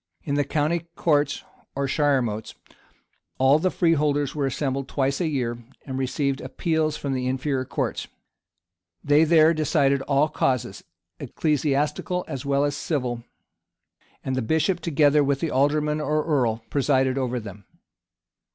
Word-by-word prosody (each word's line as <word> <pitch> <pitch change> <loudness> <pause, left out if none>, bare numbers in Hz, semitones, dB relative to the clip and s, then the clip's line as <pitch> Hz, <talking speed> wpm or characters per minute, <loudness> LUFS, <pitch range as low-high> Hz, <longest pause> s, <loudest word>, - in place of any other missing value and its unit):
In 140 - -3
the 145 0 +2
county 155 +4 -1
courts, 150 -3 +1 0.3
or 140 0 -1
shiremotes, 130 -7 0 0.8
all 135 +3 +4
the 185 - +1
freeholders 150 -5 +1
were 145 -2 -1
assembled 135 0 -2
twice 135 +2 -1
a 170 - +1
year, 120 -6 -2 0.3
and 130 -1 -4
received 135 +1 -1
appeals 160 -2 -1
from 140 -2 -3
the 125 -1 -2
inferior 130 0 -1
courts. - - -3 1.0
They 145 +2 +4
there 160 0 +5
decided 140 -3 +2
all 140 +2 +2
causes, 130 -5 -1 0.4
ecclesiastical 150 +4 -1
as 135 -1 -5
well 140 +1 +2
as 145 -1 -1
civil; 125 -6 -2 1.0
and 130 - -2
the 130 - 0
bishop, 160 - +1
together 150 -3 +3
with 140 -1 0
the 160 -1 -2
alderman 150 +3 +1
or 150 +1 0
earl, 120 -8 0
presided 135 -2 +2
over 125 -1 -1
them. 100 -3 -10
140 Hz, 140 wpm, -24 LUFS, 130-150 Hz, 1.0 s, there